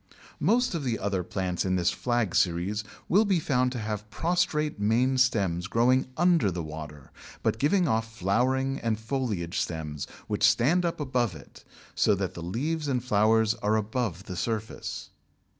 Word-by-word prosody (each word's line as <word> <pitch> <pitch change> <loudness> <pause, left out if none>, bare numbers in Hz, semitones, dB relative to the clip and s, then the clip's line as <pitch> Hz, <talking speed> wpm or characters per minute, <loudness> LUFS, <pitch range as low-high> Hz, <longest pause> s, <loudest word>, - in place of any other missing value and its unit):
Most 235 - +2
of 165 -4 -2
the 120 -4 -1
other 100 -2 -1
plants 90 0 -2
in 95 -1 0
this 90 -1 +2
Flag 120 -6 -1
series 95 +4 +1 0.2
will 205 +5 +4
be 195 -5 +2
found 125 -4 +1
to - - -4
have 105 -1 -4
prostrate 155 -1 0
main 120 +6 +2
stems 95 -8 +1
growing 125 +5 +3
under 170 - +4
the 90 -2 -3
water, 75 -3 -9 0.3
but 110 - 0
giving 170 - +3
off 115 -2 0
flowering 130 +7 0
and 110 -2 -1
foliage 110 -8 -2
stems 75 -3 -4 0.2
which 105 -1 -3
stand 120 - +4
up 170 - -2
above 125 - 0
it, 70 - -14 0.3
so 105 - +3
that 95 -1 -3
the 85 - -8
leaves 145 - -2
and 125 -3 0
flowers 110 -1 +3
are 105 +1 +2
above 110 -3 -2
the 95 -3 -7
surface. 110 +3 -4
110 Hz, 165 wpm, -27 LUFS, 95-130 Hz, 0.3 s, will